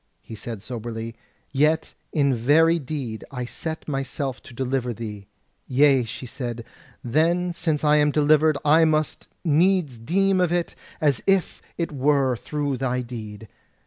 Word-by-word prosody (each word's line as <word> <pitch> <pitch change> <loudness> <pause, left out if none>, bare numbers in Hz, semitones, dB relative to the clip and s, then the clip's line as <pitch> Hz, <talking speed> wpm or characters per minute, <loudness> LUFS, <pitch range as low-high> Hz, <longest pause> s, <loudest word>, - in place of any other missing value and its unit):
He - - -10
said 110 -1 -6
soberly: 115 0 -6 0.4
"Yet 155 +3 +1 0.2
in 140 -3 +2
very 160 +8 +4
deed 130 -6 -5
I 125 -2 -4
set 160 +6 -5
myself 135 -2 -3
to - - -13
deliver 125 -1 -1
thee." 105 -3 -7 0.4
"Yea," 135 -1 +4
she 120 - -7
said, 120 -2 -5 0.4
"then 170 +7 +1
since 160 -3 -1
I 150 0 +5
am 150 0 +4
delivered, 150 +1 +4
I 155 +3 +6
must 155 -1 0 0.2
needs 165 -4 +2
deem 190 +9 +2
of 175 -2 +2
it 175 -1 0 0.3
as 145 -6 +2
if 195 -2 +2 0.2
it 170 -2 -2
were 135 -2 +2
through 145 +2 -3
thy 125 -1 -1
deed. 110 -3 -8
140 Hz, 145 wpm, -24 LUFS, 120-155 Hz, 0.4 s, I